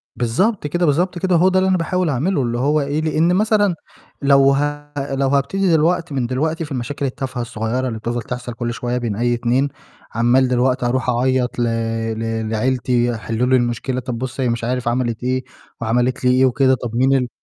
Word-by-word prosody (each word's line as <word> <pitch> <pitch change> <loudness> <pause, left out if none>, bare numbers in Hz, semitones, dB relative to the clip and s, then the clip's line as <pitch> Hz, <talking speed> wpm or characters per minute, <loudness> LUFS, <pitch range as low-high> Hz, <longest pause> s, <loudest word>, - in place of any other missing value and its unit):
بالضبط 150 - 0
كده، 175 +3 0
بالضبط 175 +4 +1
كده، 185 -1 +1
هو 180 +3 +5
ده 185 0 +2
اللي 190 0 +2
أنا 185 - +3
باحاول 175 0 0
أعملُه 145 +4 0
اللي 120 -1 -1
هو 145 +4 +2
إيه، 145 +2 -1
لإن 160 +2 +2
مثلًا 205 -3 +2 0.5
لو 140 0 +5
ه 145 +1 -2 0.2
لو 135 0 +1
هابتدي 170 +7 +1
دلوقت 165 +1 +2
من 130 -3 -1
دلوقتي 155 +5 -1
في 145 - -13
المشاكل 135 +2 -3
التافهة 130 -1 -4
الصغيرة 120 +2 -2
اللي 110 -2 -4
بتفضل 120 +1 -3
تحصل 125 0 -6
كُلّ 120 0 -3
شوية 120 +1 -2
بين 115 -4 -2
أي 120 +2 +1
اتنين 120 +4 +1 0.5
عمّال 120 +3 +3
دلوقت 125 +1 +1
هارُوح 125 +1 0
أعيط 125 0 0
ل - - +2 0.6
ل 115 -1 -2
لعيلتي 120 0 0
حلّوا 115 +3 -2
لي 130 - +4
المشكلة، 120 +1 -1
طَب 125 -2 -4
بُصّ 130 +2 -5
هي 125 - +1
مش 115 0 -2
عارف 125 0 -2
عَمَلِت 120 -1 -1
إيه 130 0 0 0.4
وعَمَلِت 120 +3 0
لي 125 - +5
إيه 130 +1 +4
وكده 130 +1 +3
طَب 115 -1 -4
مين 135 +2 +3
ال 125 -2 0
130 Hz, 200 wpm, -19 LUFS, 120-145 Hz, 0.6 s, هو